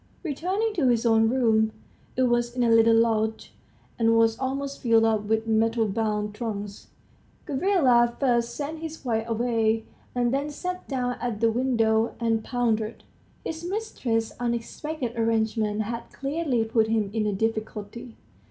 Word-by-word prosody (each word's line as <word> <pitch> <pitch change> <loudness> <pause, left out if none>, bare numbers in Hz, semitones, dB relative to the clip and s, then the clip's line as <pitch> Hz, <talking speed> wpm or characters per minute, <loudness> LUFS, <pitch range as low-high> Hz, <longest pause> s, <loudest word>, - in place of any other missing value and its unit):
Returning 375 +8 -1
to 320 -10 +1
his 240 -1 +2
own 225 -1 +4
room 220 -3 +2 0.4
(it 260 - +3
was 240 -1 +1
in 250 - +1
a 235 - +3
little 225 0 +6
lodge, 220 -1 +1 0.5
and 230 0 +4
was 225 0 +4
almost 275 +1 -3
filled 225 -2 +4
up 215 -2 +1
with 220 +1 0
metal 225 0 +2
bound 210 0 -1
trunks), 205 -2 -5 0.6
Gavrila 265 -7 +3
first 240 -3 +1
sent 300 +2 -4
his 320 -2 -7
wife 225 -1 -1
away, 225 -1 +1 0.3
and 245 0 +1
then 280 +2 0
sat 360 +5 -5
down 250 -2 -2
at 240 -4 -2
the 230 0 +3
window 230 -2 +1
and 225 -2 0
pondered. 225 -3 -1 0.4
His 325 +1 -4
mistress's 305 - -2
unexpected 245 +3 -3
arrangement 220 -2 0
had 235 +2 -6
clearly 275 -4 -1
put 225 0 +1
him 220 -3 0
in 220 -2 0
a 205 - 0
difficulty. 220 +2 -4
230 Hz, 150 wpm, -26 LUFS, 220-260 Hz, 0.6 s, little